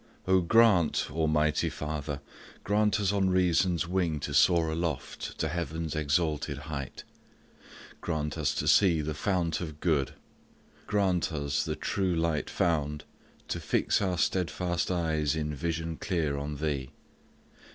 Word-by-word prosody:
Oh, 95 0 +5
grant, 95 -3 +4
almighty 75 -1 +1
Father, 75 -1 -4 0.4
Grant 105 0 +2
us 100 -2 +1
on 95 -2 +2
reason's 90 -1 +2
wing 85 -4 0
to 70 - -4
soar 85 +1 +4
aloft 80 -3 -4
To - - 0
heaven's 80 -1 -3
exalted 75 -1 0
height; 70 -2 -6 1.0
grant 75 -3 -2
us - - 0
to - - -2
see 85 -6 +5
The 75 +1 -3
fount 85 +1 -1
of 75 -3 -6
good; 75 -6 0 0.7
grant 95 -4 +1
us, 70 -2 -1
the - - -3
true 95 -3 -1
light 80 -2 0
found, 75 -3 0 0.5
To - - -2
fix - - +1
our 95 -3 0
steadfast 85 0 0
eyes 80 -4 0
in 75 -1 -2
vision 80 +1 -3
clear 80 -7 -1
On 70 +1 -4
Thee. 70 -3 -2
80 Hz, 135 wpm, -29 LUFS, 75-90 Hz, 1.0 s, Oh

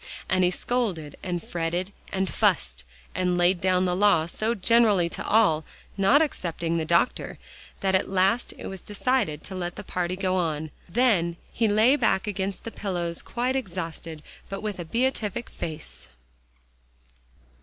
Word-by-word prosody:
and 185 0 +2
he 180 - +5
scolded, 180 - -2
and 175 -2 -3
fretted, 175 +3 -2 0.2
and 190 0 0
fussed, 60 - +1 0.3
and 180 0 +1
laid 175 +1 +3
down 185 -1 +3
the 180 -1 +1
law 190 -5 +4
so 220 +7 -1
generally 210 -3 +4
to - - -6
all, 200 -8 +3 0.3
not 205 +10 +5
excepting 170 - -2
the 160 - -1
doctor, 170 +8 +1 0.4
that 190 -1 +1
at 190 - +2
last 195 +5 +2
it - - -8
was 190 -2 -6
decided 205 - 0
to 190 - -7
let 175 -1 -4
the - - -7
party 180 0 -2
go 185 -1 0
on. 160 -4 -1 0.2
Then 175 -6 +2 0.2
he 225 - +2
lay 215 +6 +5
back 190 -9 +2
against 195 -2 -3
the 230 - -6
pillows 175 -5 -3
quite 250 +2 -1
exhausted, 165 - -5 0.3
but 195 +1 -5
with 210 -3 -3
a 175 - -4
beatific 235 +1 -1
face. 160 -2 -5
185 Hz, 155 wpm, -26 LUFS, 170-210 Hz, 0.4 s, he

